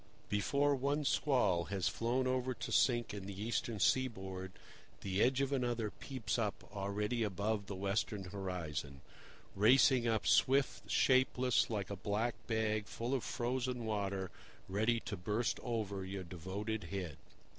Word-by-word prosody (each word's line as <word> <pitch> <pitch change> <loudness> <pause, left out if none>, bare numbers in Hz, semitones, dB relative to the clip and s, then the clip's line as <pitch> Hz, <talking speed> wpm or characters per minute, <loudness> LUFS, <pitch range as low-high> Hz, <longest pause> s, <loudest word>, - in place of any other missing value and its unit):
Before 140 +8 +2
one 140 +2 0
squall 105 - +2
has 95 -2 -1
flown 120 +3 0
over 130 0 0
to - - -5
sink 120 -4 +3
in 100 -2 -6
the 100 -1 -7
eastern 115 +1 -1 0.3
board, 95 -3 -7 0.5
the 95 +1 0
edge 130 +2 +3
of 140 0 0
another 120 -5 0
peeps 130 -3 -3
up 105 -3 -2
already 105 +4 -1
above 105 0 -1
the 100 - -4
western 100 +1 -1
horizon, 85 -8 -4 0.5
racing 120 +3 +5
up 110 -2 +1
swift, 135 +1 +3
shapeless, 130 -1 +3
like 105 -3 -2
a - - -2
black 105 +5 -1
bag 110 -2 0
full 120 +3 -3
of 130 - 0
frozen 125 -1 -2
water 100 -3 -2 0.4
ready 110 +5 +1
to 115 -4 -4
burst 105 +6 -1
over 105 -5 -2
your 95 0 -5
devoted 95 +6 -4
head. 90 -7 -4
110 Hz, 145 wpm, -35 LUFS, 100-125 Hz, 0.5 s, racing